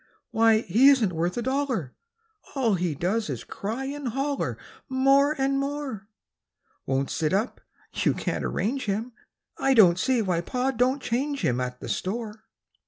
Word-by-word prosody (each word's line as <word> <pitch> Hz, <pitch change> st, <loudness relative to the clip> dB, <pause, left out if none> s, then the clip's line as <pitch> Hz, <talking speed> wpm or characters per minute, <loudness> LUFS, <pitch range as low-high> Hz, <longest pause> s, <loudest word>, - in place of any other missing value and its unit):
Why, 225 Hz, -1 st, +4 dB
he 230 Hz, +7 st, +5 dB
isn't 235 Hz, -10 st, +3 dB
worth 170 Hz, +4 st, -1 dB
a 240 Hz, -, -1 dB
dollar! 260 Hz, -, -1 dB, 0.6 s
All 245 Hz, -6 st, +2 dB
he 175 Hz, -4 st, -1 dB
does 210 Hz, +9 st, -1 dB
is -, -, -4 dB
cry 225 Hz, +7 st, -5 dB
and 285 Hz, 0 st, -4 dB
holler 275 Hz, +4 st, -2 dB, 0.3 s
More 275 Hz, +3 st, +4 dB
and 275 Hz, 0 st, +1 dB
more; 275 Hz, -8 st, -4 dB, 0.8 s
Won't 135 Hz, 0 st, 0 dB
sit 160 Hz, +1 st, 0 dB
up 215 Hz, +6 st, -1 dB, 0.3 s
you -, -, +1 dB
can't -, -, -2 dB
arrange 255 Hz, +6 st, -1 dB
him, 215 Hz, +4 st, -2 dB, 0.5 s
I 270 Hz, -1 st, +3 dB
don't 185 Hz, -6 st, +6 dB
see 255 Hz, +1 st, +2 dB
why 180 Hz, -4 st, 0 dB
Pa 250 Hz, +8 st, -1 dB
do'n't 260 Hz, +2 st, +1 dB
change 280 Hz, +4 st, -1 dB
him 125 Hz, 0 st, +1 dB
At 125 Hz, 0 st, -4 dB
the -, -, -6 dB
store. 220 Hz, +2 st, -4 dB
230 Hz, 160 wpm, -26 LUFS, 190-270 Hz, 0.8 s, don't